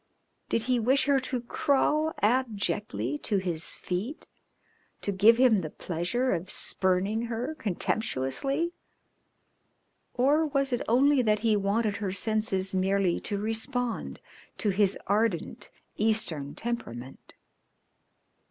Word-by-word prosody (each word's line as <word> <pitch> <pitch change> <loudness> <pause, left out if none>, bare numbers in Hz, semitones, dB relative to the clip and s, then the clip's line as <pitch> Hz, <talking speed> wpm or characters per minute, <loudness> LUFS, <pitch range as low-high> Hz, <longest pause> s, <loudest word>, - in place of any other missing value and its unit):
Did 225 - 0
he 250 0 +1
wish 265 +6 +3
her 280 -2 +3
to 255 -1 -4
crawl 295 +5 +1
abjectly 200 - 0
to 205 - +2
his 175 -4 -2
feet 205 - -4 0.8
to 200 - 0
give 210 +4 +5
him 250 -4 +5
the 165 -5 -3
pleasure 185 +13 -2
of 175 +3 -4
spurning 195 +5 0
her 235 +6 -3
contemptuously, 225 - -1 1.4
or 290 +6 +3
was 275 -2 0
it 245 - 0
only 265 +4 +4
that 215 -3 +1
he 220 -2 +3
wanted 205 +1 0
her 200 -3 -3
senses 195 -2 0
merely 190 -1 +1
to 205 - -3
respond 225 +3 -2 0.4
to 210 - +1
his 195 0 +2
ardent, 205 -3 -1 0.3
Eastern 205 -10 +1
temperament? 135 - -6
215 Hz, 115 wpm, -28 LUFS, 190-250 Hz, 1.4 s, give